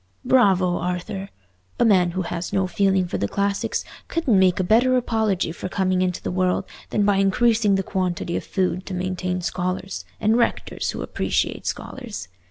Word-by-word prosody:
"Bravo, 190 -8 +4
Arthur! 180 +3 -3 0.5
A - - +4
man 185 -5 +4
who 185 - 0
has 170 0 -4
no 195 -1 +1
feeling 190 +1 +2
for - - -3
the 100 - 0
classics 200 - -1 0.2
couldn't 280 - +2
make 185 -1 +4
a - - +2
better 245 +7 +4
apology 220 -8 0
for 175 - -6
coming 185 -1 +1
into 180 -1 -1
the - - -2
world 185 0 +1 0.2
than 205 - +1
by 200 -1 +3
increasing 210 +1 +3
the 195 - 0
quantity 180 -2 -2
of - - -2
food 185 -1 -1
to 190 - -4
maintain 185 0 -2
scholars—and 180 - -2
rectors 235 - 0
who - - -3
appreciate - - -1
scholars. 230 - -5
190 Hz, 170 wpm, -23 LUFS, 180-205 Hz, 0.5 s, Bravo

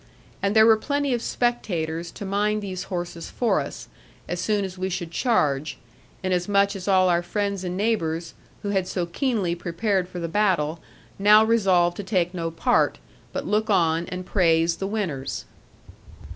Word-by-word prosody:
And 200 +2 0
there 220 0 +7
were 225 -1 +6
plenty 285 +3 -1
of 240 - -1
spectators 175 -11 -1
to 205 - -7
mind 210 +2 0
these 185 -2 -5
horses 175 -3 -5
for 240 - +1
us, - - -6 0.4
as - - -3
soon 210 -2 +1
as 185 -1 -7
we 185 0 -3
should 175 -2 -4
charge; 155 - +1 0.5
inasmuch 200 +2 +2
as 190 -1 -7
all 185 -2 +4
our 175 -1 +3
friends 200 +1 -2
and 180 0 -3
neighbours, 170 -6 -1 0.3
who 205 - -2
had 190 -2 0
so 180 -2 -2
keenly 200 -1 -1
prepared 180 +2 -1
for 180 - -6
the 170 - -3
battle, 170 -5 +1 0.4
now 210 +2 +7
resolved 185 -6 +3
to 205 - -4
take 185 -3 0
no 165 -2 -2
part, 165 - +1 0.3
but - - -4
look 215 +1 0
on, 170 -3 +2
and 180 0 -5
praise 165 -3 +2
the 195 - -3
winners. 165 -11 -3
185 Hz, 170 wpm, -24 LUFS, 170-210 Hz, 0.5 s, there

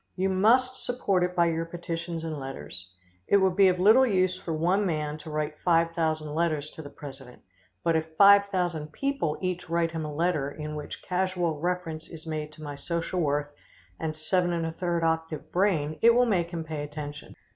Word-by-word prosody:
You 190 +1 0
must 245 +7 +3
support 205 -7 0
it 180 0 -1
by 170 -1 +4
your 165 0 0
petitions 170 0 -5
and 155 -2 -4
letters. 115 -9 -7 0.4
It 200 - +5
would 190 -2 +2
be 195 -1 +6
of 180 -1 +2
little 220 +8 +7
use 185 -6 +2
for 180 - -6
one 175 +6 +2
man 155 -4 -2
to 155 - -9
write 150 0 -3
five 165 -1 +3
thousand 155 -2 -1
letters 155 -2 0
to - - -9
the 145 - -9
president, 135 -3 -11 0.4
but 165 -1 +2
if 160 0 -2
five 200 0 +8
thousand 175 -6 -2
people 275 - -1
each 180 -2 -3
write 170 0 +1
him 165 -1 -3
a 150 - -4
letter 155 -2 0
in 150 +1 -6
which 150 -1 -7
casual 180 -4 -1
reference 165 -2 -3
is 165 -1 -10
made 155 -1 -4
to 155 - -12
my 145 -1 -5
social 170 +4 -3
worth 145 -1 0 0.5
and 160 -1 -3
7 175 +3 +1
1/3 170 0 -1
octave 160 -1 -1
brain, 160 -5 +1
it 235 +1 +6
will 245 0 +5
make 180 -7 +1
him 170 -2 -4
pay 155 -2 -5
attention. 150 0 -7
165 Hz, 195 wpm, -27 LUFS, 155-185 Hz, 0.5 s, five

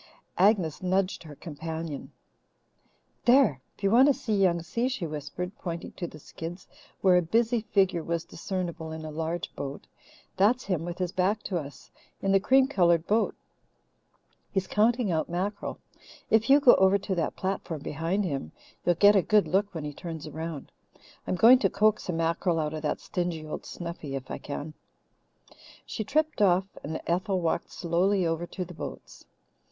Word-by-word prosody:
Agnes 185 -6 +3
nudged 185 +1 0
her 150 -3 -11
companion. 160 -1 -6 1.1
"There! 240 - +5 0.2
If - - -20
you 195 - +3
want 255 +5 +7
to 285 - +4
see 220 - -3
Young 180 -4 +2
Si," 230 +9 -1
she 260 -9 -3
whispered, 155 +5 -5
pointing 170 -2 -5
to 175 - -5
the 155 - -11
skids, 165 +4 -8 0.3
where 185 -2 +5
a - - +4
busy 230 +7 +1
figure 190 -5 +1
was 170 0 -2
discernible 170 -3 -4
in 160 0 -6
a 155 - -6
large 165 +2 -3
boat, 140 0 -6 0.5
"that's 230 +6 +3
him, 175 -4 -2
with 175 0 -5
his 180 -2 -2
back 195 +4 0
to 180 -3 -2
us, 145 -2 -10 0.3
in 195 - 0
the 195 - +5
cream 265 +6 +4
coloured 170 - +3
boat. 220 +2 +1 1.1
He's 190 -2 -1
counting 225 +1 +2
out 160 0 0
mackerel. 190 +4 -3 0.5
If 220 +3 +3
you 280 +2 +8
go 270 -4 +8
over 190 +1 +5
to 200 0 -3
that 170 -3 -1
platform 185 -5 -3
behind 170 +7 -1
him, 135 - -4 0.3
you'll 175 - +3
get 205 +4 +6
a 195 - +6
good 210 +1 +3
look 200 +2 +1
when 160 - -4
he 150 0 -5
turns 160 0 -7
around. 160 -1 -6 0.6
I'm - - 0
going 240 +7 +7
to 195 - +2
coax 210 0 +2
a - - 0
mackerel 165 +1 0
out 155 -1 -1
of 155 - -4
that 150 - -1
stingy 175 -3 -3
old 155 - -6
Snuffy, 170 -5 -6
if 135 -1 -6
I - - -4
can." 145 +2 -6 1.1
She 220 - -4
tripped 305 +4 0
off, 185 -1 +4 0.2
and 160 +2 -4
Ethel 185 +3 0
walked 170 0 -1
slowly 180 +3 +1
over 165 +1 -1
to 180 0 -5
the 180 - -10
boats. - - -9
180 Hz, 180 wpm, -28 LUFS, 160-200 Hz, 1.1 s, you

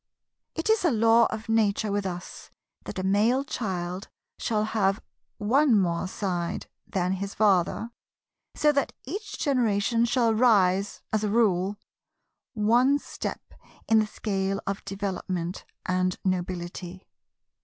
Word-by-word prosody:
It 325 - -3
is 440 -3 +2
a 345 - +4
Law 230 -1 +5
of 220 0 -6
Nature 220 -1 +1
with 200 -1 -1
us 175 -1 -7 0.4
that - - -6
a 185 - -2
male 215 +8 +3
child 190 - -4 0.3
shall 215 -2 0
have 205 -2 +1 0.4
one 235 +2 +4
more 175 -1 0
side 180 -3 -3 0.2
than 180 -1 -1
his 195 +1 -3
father, 205 +2 +2 0.6
so 300 - +4
that 280 -1 0
each 405 - -6
generation 235 -4 +2
shall 235 -1 +2
rise 200 -4 +3
(as 215 0 +1
a 210 - +1
rule) 200 -3 +2 0.8
one 240 +6 +4
step - - -6 0.3
in 225 0 +5
the 215 - +1
scale 195 -2 -2
of 195 0 -3
development 185 -3 -4 0.2
and 185 0 0
nobility. 180 0 -3
205 Hz, 130 wpm, -27 LUFS, 185-230 Hz, 0.8 s, Law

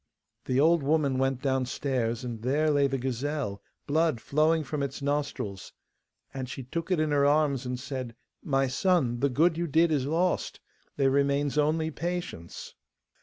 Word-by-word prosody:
The 130 +1 +1
old 165 +2 +4
woman 140 -2 +1
went 135 -1 0
downstairs, 130 -3 -1
and 120 -3 -5
there 145 +6 +1
lay 140 -1 +3
the 135 0 -2
gazelle, 130 -3 -3 0.2
blood 155 -3 +1
flowing 155 +6 +2
from 145 +1 -4
its 140 -2 -3
nostrils. 140 -9 -3 0.6
And 130 -2 -5
she 130 - -6
took 165 +7 -5
it 180 -4 +2
in 155 -1 +1
her 145 -1 +3
arms 140 -3 +2
and 125 0 -3
said, 130 -3 -5 0.3
'My 135 -1 +1
son, 130 -3 +1
the 140 - +2
good 160 +6 +2
you 170 - -1
did 165 +2 +3
is 140 -3 +1
lost; 175 +4 0 0.4
there 135 -1 +3
remains 140 +1 +1
only 155 +2 +1
patience. 170 - -5
140 Hz, 165 wpm, -28 LUFS, 130-155 Hz, 0.6 s, old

